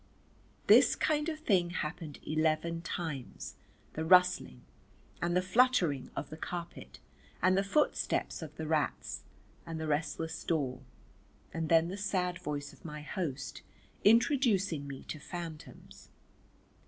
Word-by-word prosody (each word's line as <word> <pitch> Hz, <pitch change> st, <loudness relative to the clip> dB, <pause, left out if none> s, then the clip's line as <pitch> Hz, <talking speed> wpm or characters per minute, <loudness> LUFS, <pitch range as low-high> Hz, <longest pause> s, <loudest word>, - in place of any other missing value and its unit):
This -, -, +7 dB
kind 305 Hz, +1 st, +1 dB
of 310 Hz, -1 st, -5 dB
thing 185 Hz, -, +3 dB
happened 155 Hz, -3 st, -4 dB
eleven 160 Hz, +2 st, +1 dB
times, 160 Hz, -6 st, -5 dB, 0.4 s
the 160 Hz, -, -2 dB
rustling, 180 Hz, -, +4 dB, 0.6 s
and 175 Hz, +1 st, +1 dB
the 180 Hz, -, +2 dB
fluttering 190 Hz, -, +3 dB
of -, -, -4 dB
the 155 Hz, -, -7 dB
carpet 170 Hz, +1 st, -6 dB, 0.4 s
and 185 Hz, +2 st, +4 dB
the 195 Hz, -, +4 dB
footsteps 245 Hz, 0 st, 0 dB
of 155 Hz, -1 st, -8 dB
the 160 Hz, -, -5 dB
rats, 155 Hz, -2 st, -1 dB, 0.4 s
and 165 Hz, -1 st, -5 dB
the 160 Hz, -, -3 dB
restless 160 Hz, +1 st, -2 dB
door, 135 Hz, -6 st, -1 dB, 0.7 s
and 160 Hz, -1 st, -2 dB
then 165 Hz, 0 st, +5 dB
the 190 Hz, -, -5 dB
sad 185 Hz, -3 st, -1 dB
voice 145 Hz, -1 st, -4 dB
of -, -, -19 dB
my 150 Hz, -2 st, -7 dB
host 145 Hz, -5 st, -4 dB, 0.4 s
introducing 205 Hz, -, +3 dB
me 135 Hz, -1 st, -7 dB
to 155 Hz, -, -6 dB
phantoms. 165 Hz, 0 st, -9 dB
165 Hz, 130 wpm, -32 LUFS, 155-185 Hz, 0.7 s, This